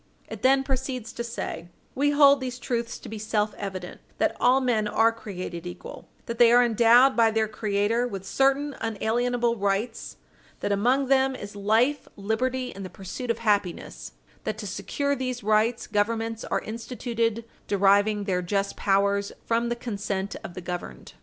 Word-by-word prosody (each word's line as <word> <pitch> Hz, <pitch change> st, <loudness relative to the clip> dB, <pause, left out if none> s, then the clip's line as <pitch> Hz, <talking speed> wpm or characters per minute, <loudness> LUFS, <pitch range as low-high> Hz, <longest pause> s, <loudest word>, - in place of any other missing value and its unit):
It -, -, -8 dB
then 270 Hz, +1 st, +4 dB
proceeds 260 Hz, -3 st, -3 dB
to 235 Hz, -, -4 dB
say: 230 Hz, -7 st, -5 dB, 0.3 s
"We 285 Hz, +2 st, +2 dB
hold 285 Hz, -1 st, +6 dB
these 255 Hz, -1 st, -4 dB
truths 235 Hz, -1 st, -3 dB
to -, -, -11 dB
be 220 Hz, 0 st, -6 dB
self 215 Hz, -1 st, 0 dB
evident: 190 Hz, -3 st, -7 dB, 0.2 s
that -, -, +1 dB
all 255 Hz, +2 st, +4 dB
men 235 Hz, -5 st, +1 dB
are 225 Hz, +2 st, +3 dB
created 180 Hz, -6 st, -7 dB
equal; 175 Hz, -, -9 dB, 0.2 s
that 235 Hz, 0 st, -5 dB
they 235 Hz, -1 st, +7 dB
are 245 Hz, +1 st, +7 dB
endowed 240 Hz, +3 st, +5 dB
by 230 Hz, -1 st, +5 dB
their 220 Hz, 0 st, +1 dB
Creator 215 Hz, +2 st, 0 dB
with 195 Hz, -5 st, -6 dB
certain 275 Hz, +6 st, +1 dB
unalienable 235 Hz, +2 st, 0 dB
rights; 200 Hz, +3 st, -2 dB, 0.4 s
that -, -, -1 dB
among 245 Hz, +7 st, +2 dB
them 265 Hz, 0 st, +3 dB
is 205 Hz, -4 st, -8 dB
life, 225 Hz, +8 st, +1 dB
liberty, 250 Hz, +5 st, -2 dB
and 195 Hz, -, -8 dB
the 185 Hz, -, -6 dB
pursuit 195 Hz, +7 st, -7 dB
of 230 Hz, -, +1 dB
happiness; 205 Hz, -5 st, -1 dB, 0.3 s
that 215 Hz, -1 st, -3 dB
to 220 Hz, -, -6 dB
secure 280 Hz, +8 st, -2 dB
these 255 Hz, -3 st, -4 dB
rights, 220 Hz, +3 st, +2 dB
Governments 225 Hz, +2 st, -1 dB
are -, -, -1 dB
instituted, 230 Hz, 0 st, -3 dB, 0.2 s
deriving 205 Hz, +1 st, +3 dB
their 185 Hz, -3 st, 0 dB
just 195 Hz, +2 st, -1 dB
powers 200 Hz, 0 st, +1 dB
from 235 Hz, +1 st, +1 dB
the 240 Hz, -, -1 dB
consent 200 Hz, -4 st, -4 dB
of 175 Hz, -, -8 dB
the 185 Hz, -, -6 dB
governed." 180 Hz, 0 st, -7 dB
225 Hz, 165 wpm, -26 LUFS, 200-245 Hz, 0.4 s, they